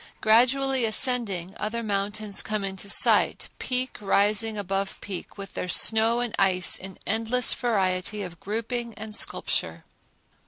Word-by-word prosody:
Gradually 255 +4 +2
ascending, 220 -6 -1
other 230 +2 -4
mountains 205 0 -1
come 215 -2 -4
in 190 -1 -4
sight, 200 +1 +3
peak 255 0 -3
rising 210 +2 +1
above 195 0 -3
peak 195 0 -8
with 195 -1 -8
their - - -5
snow 225 +5 +4
and 240 -3 -3
ice 185 -2 +4
in 190 0 -4
endless 225 +3 +1
variety 200 -3 -1
of 175 -3 -9
grouping 230 +2 -4
and 215 +1 -7
sculpture. - - 0
215 Hz, 130 wpm, -25 LUFS, 195-235 Hz, -, snow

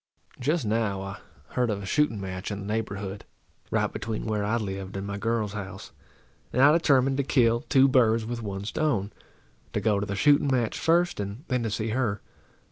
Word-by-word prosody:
Just 150 +2 0
now 105 -2 0
I 95 +1 -7 0.3
heard 125 -2 0
of 100 -2 -2
a - - -5
shooting 115 +1 +1
match 95 -1 -5
in 100 -1 -4
the - - -7
neighbourhood, 100 -2 -3 0.5
right - - 0
between 110 -1 -4
where 105 -2 -1
I 110 +3 +1
lived 95 -2 -4
and 95 - -4
my 100 0 -4
girl's 110 -2 -1
house; 100 -1 -7 0.6
and 125 - -1
I 145 - +8
determined 135 -5 +3
to 140 - +1
kill 120 -3 +3
two 135 0 +6
birds 115 -4 +3
with 120 +1 -4
one 100 -2 -5
stone, 110 -5 -1 0.6
to - - +1
go 105 -3 +2
to 100 - -2
the 100 - -2
shooting 145 +5 +4
match 120 -4 0
first, 175 -2 +2
and 100 +6 -5
then 125 -2 +1
to 115 - -1
see 110 +1 -2
her. 110 -4 0
110 Hz, 200 wpm, -27 LUFS, 100-125 Hz, 0.6 s, I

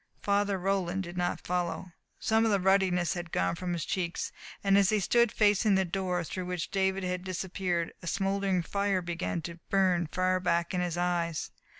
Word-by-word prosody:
Father 200 -1 +2
Roland 190 0 0
did 175 0 -8
not 175 0 -2
follow. 180 0 -2 0.3
Some 220 0 +2
of 225 - +3
the 200 -2 +3
ruddiness 185 -2 +3
had 175 -2 -6
gone 90 0 +1
from 180 -1 -3
his 165 -3 -2
cheeks, 175 -2 -2 0.3
and 195 -1 +4
as 200 -1 +5
he 215 - +3
stood 235 +4 +3
facing 210 -1 +3
the 190 0 +2
door 180 -1 -1
through 180 +2 -5
which 180 -4 -3
David 190 0 +1
had 180 0 -2
disappeared 185 -2 -2
a 170 - -8
smouldering 195 -1 0
fire 200 0 0
began 170 -1 -3
to 170 -1 -7
burn 185 -4 +2
far 185 +3 +1
back 170 0 0
in 180 - 0
his 175 -1 -2
eyes. 175 -2 -1
185 Hz, 190 wpm, -30 LUFS, 175-195 Hz, 0.3 s, as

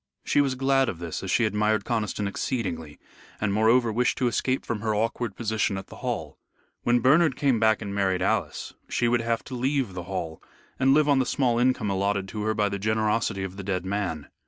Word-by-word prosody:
She 145 - +3
was 135 -2 0
glad 135 0 +2
of 95 - -5
this 85 -1 -5
as 95 - -5
she 115 - +3
admired 105 0 +1
Conniston 105 -3 -1
exceedingly, 90 - -3 0.4
and, 105 -2 0
moreover, 110 +2 +3
wished 125 +2 +1
to 125 - +1
escape 130 +2 0
from 110 - -2
her 110 -1 0
awkward 115 0 -1
position 110 -3 -1
at 95 - -8
the - - -11
Hall. - - -4 0.4
When 120 0 +2
Bernard 150 +3 +4
came 135 -5 +2
back 110 0 +3
and 100 -1 -5
married 95 -2 +1
Alice, - - -1 0.2
she 120 - +1
would 120 0 +2
have 115 0 -1
to 130 - -10
leave 130 -4 0
the 90 -1 -6
Hall 85 -4 -4 0.4
and 135 +1 +4
live 150 -1 +4
on 140 -2 +4
the 130 - +2
small 120 -4 +1
income 125 -4 +1
allotted 100 0 0
to 105 - -5
her 110 0 0
by 105 -1 +2
the 100 0 -3
generosity 110 -1 0
of 95 0 -6
the 100 - -6
dead 95 -2 -2
man. 95 -7 -3
110 Hz, 215 wpm, -26 LUFS, 100-125 Hz, 0.4 s, Bernard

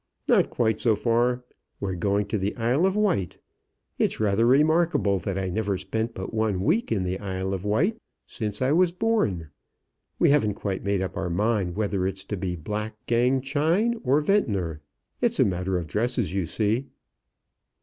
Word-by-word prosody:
"Not - - +4
quite 110 -2 0
so 115 -3 +3
far. 120 +3 +1 0.4
We're 100 -2 -2
going 100 +3 0
to 110 - 0
the 100 +2 -2
Isle 125 +10 +2
of 190 - -1
Wight. 190 - 0 0.6
It's - - +1
rather 110 +2 +2
remarkable 150 - +3
that 95 +2 -3
I 95 -1 -1
never 100 0 -1
spent 110 +5 -3
but 95 +3 -6
one 110 -4 0
week 225 - +1
in 100 -5 +1
the 90 +1 -2
Isle 95 -1 -3
of 95 -1 -4
Wight 160 - +1 0.3
since 105 +1 -4
I 130 - +2
was 175 +2 +4
born. 175 - 0 0.7
We - - +4
haven't 110 -9 +2
quite 95 -3 -3
made 100 -1 0
up 95 - -5
our 95 -1 -2
mind 100 -1 0
whether 100 -3 0
it's 95 0 -5
to 105 - -3
be 90 -2 -3
Black 105 +6 -4
Gang 125 +3 +2
Chine 170 - +1
or 135 +3 +3
Ventnor. 100 - 0 0.4
It's - - +1
a - - +6
matter 90 0 -1
of 85 - -3
dresses, 110 - -1
you 95 -4 -1
see." 110 +8 0
105 Hz, 180 wpm, -25 LUFS, 95-130 Hz, 0.7 s, a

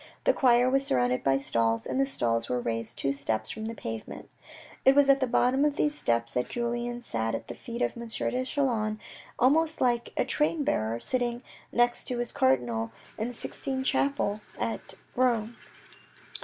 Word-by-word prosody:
The - - +4
choir 245 -1 +4
was 270 +1 +3
surrounded 125 - +1
by 135 0 +3
stalls, 115 -4 0
and 270 - 0
the 270 - +2
stalls 115 - 0
were 125 - 0
raised 115 -1 -3
two 135 - 0
steps 135 -6 -2
from 220 0 -5
the 225 +1 -4
pavement. 115 - -7 0.5
It 265 - +6
was 285 -1 +5
at 275 0 +6
the 260 - +1
bottom 255 +3 +3
of 295 -1 +2
these 300 -1 +1
steps 115 - 0
that 125 - -1
Julien 240 0 -2
sat 115 - -1
at - - -6
the - - -4
feet 235 -1 -4
of - - -1
M. 235 0 -7
de 250 +3 -1
Chelan 235 -6 0 0.4
almost 315 +5 +3
like 240 -2 +1
a - - +2
train 300 +4 +1
bearer 110 - 0
sitting 245 - -1 0.3
next 240 0 +2
to 250 - -3
his 240 -1 -2
cardinal 120 -4 +1 0.3
in 220 - -1
the 245 - -6
Sixtine 265 +3 -4
chapel 275 -8 +1 0.2
at - - -3 0.2
Rome. 240 -3 +1
235 Hz, 185 wpm, -28 LUFS, -, 0.5 s, It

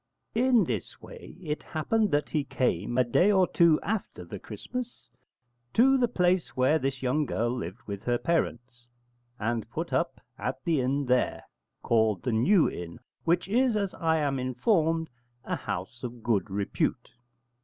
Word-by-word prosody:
In 245 -1 +4
this 115 - -4
way - - -12
it 150 -2 -3
happened 210 +8 0
that 145 -2 0
he 150 -3 0
came, 120 - -1
a 130 - +5
day 175 - +3
or 190 -2 +5
two 170 -3 +4
after 215 -1 -3
the - - -7
Christmas, 250 - -7 0.6
to 265 +4 +6
the 250 -2 +3
place 180 - +1
where 135 +5 +4
this 135 -1 -3
young 135 +4 +2
girl 120 +1 0
lived 120 -1 -5
with 100 -1 -5
her 120 0 +2
parents, 120 -4 -2 0.5
and 115 0 -2
put - - -4
up - - 0 0.2
at - - -3
the 160 -5 +2
inn 135 +3 0
there, 125 0 +1 0.4
called 110 -4 +2
the 125 - 0
New 160 - +4
Inn, 85 -1 -6 0.3
which 170 +2 +2
is, 240 +2 +2
as 200 -2 -1
I 160 -1 +1
am 140 -3 0
informed, 160 - +1 0.4
a - - -2
house 95 +7 -5
of 120 -2 -7
good 110 -3 +1
repute. 100 +1 -2
140 Hz, 165 wpm, -28 LUFS, 120-180 Hz, 0.6 s, to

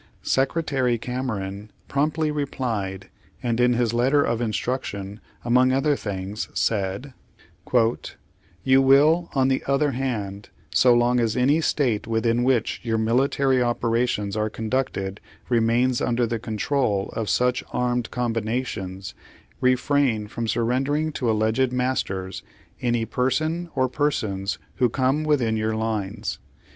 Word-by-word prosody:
Secretary 135 -3 +1
Cameron 110 -5 -4 0.2
prompt 145 +2 0
Page 155 -1 0
Sixty - - -1
Page 140 - -1
Sixty 135 - -7
one - - +1
ly - - 0
replied, 95 -1 -5 0.3
and 120 -1 0
in 125 0 +4
his 120 -1 +1
letter 130 +5 +3
of 120 0 -1
instruction, 105 -3 -3 0.3
among 125 +2 +4
other 135 +3 +2
things 100 -2 -5
said: 105 +5 -1 1.5
"You 130 0 +5
will, 150 +6 +4
on 130 -1 +3
the 135 0 +1
other 140 +1 +2
hand, 105 -7 -4 0.2
so 125 -2 +5
long 120 +1 +3
as 115 0 0
any 140 +6 +3
State 125 -9 0
within 115 +1 +1
wliich 125 -3 +1
your 115 -2 0
military 130 +3 +2
operations 115 -4 0
are 110 0 0
conducted 110 -4 -2 0.3
remains 120 +1 +2
under 120 0 +1
the 115 0 -2
control 110 -2 -1
of 110 -2 -2
such 125 0 +1
anned 125 -1 -1
combinations, 115 -5 -3 0.5
refrain 130 -3 +2
from 115 +1 -4
surrendering 135 +7 0
to 125 -5 -2
alleged 110 +4 +1
masters 125 -7 -2 0.4
any 120 -2 +1
person 155 +9 -1
or 130 -1 +2
per 145 +4 +1
sons 100 -7 -3 0.2
who 125 -2 +3
come 135 +5 +1
within 130 -8 +1
your 110 0 -1
lines. 110 -1 -3
120 Hz, 140 wpm, -24 LUFS, 110-130 Hz, 1.5 s, You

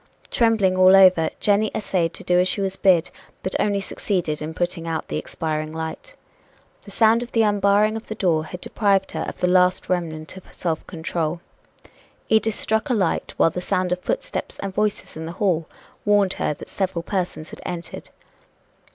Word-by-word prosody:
Trembling 220 -5 +3
all 185 +1 +7
over, 185 -4 +6
Jenny 210 +1 +2
essayed 180 -5 0
to - - -8
do 180 -1 +3
as 180 - +3
she 215 - -1
was 195 -1 -1
bid, 185 -4 +3 0.3
but 190 - -2
only 205 -1 +1
succeeded 180 -6 -2
in 155 +1 -5
putting 175 -1 -2
out 165 -1 -3
the - - -2
expiring 155 -1 -3
light. 160 - -6 0.7
The - - -14
sound 225 +3 +4
of 245 - -7
the 225 - +4
unbarring 205 +1 +3
of 225 - -7
the 220 - -5
door 165 -6 +1
had 180 +2 -8
deprived 195 -2 +1
her - - -3
of - - -7
the 180 - +2
last 180 0 +3
remnant 160 -3 -3
of 190 - -13
self 165 -3 -3
control. 165 -1 -3 0.9
Edith 220 0 +3
struck 220 +5 -1
a 250 - +2
light, 190 -6 -1
while 165 - +4
the 180 - -4
sound 180 0 0
of 180 - 0
footsteps - - -3
and 195 -1 -4
voices 210 +1 -1
in 160 +1 -6
the 165 - -6
hall 170 -4 0 0.4
warned 205 -2 +3
her 150 - 0
that - - -11
several 185 -3 -2
persons 175 -5 -3
had - - -10
entered. 170 -1 -6
185 Hz, 185 wpm, -22 LUFS, 165-205 Hz, 0.9 s, all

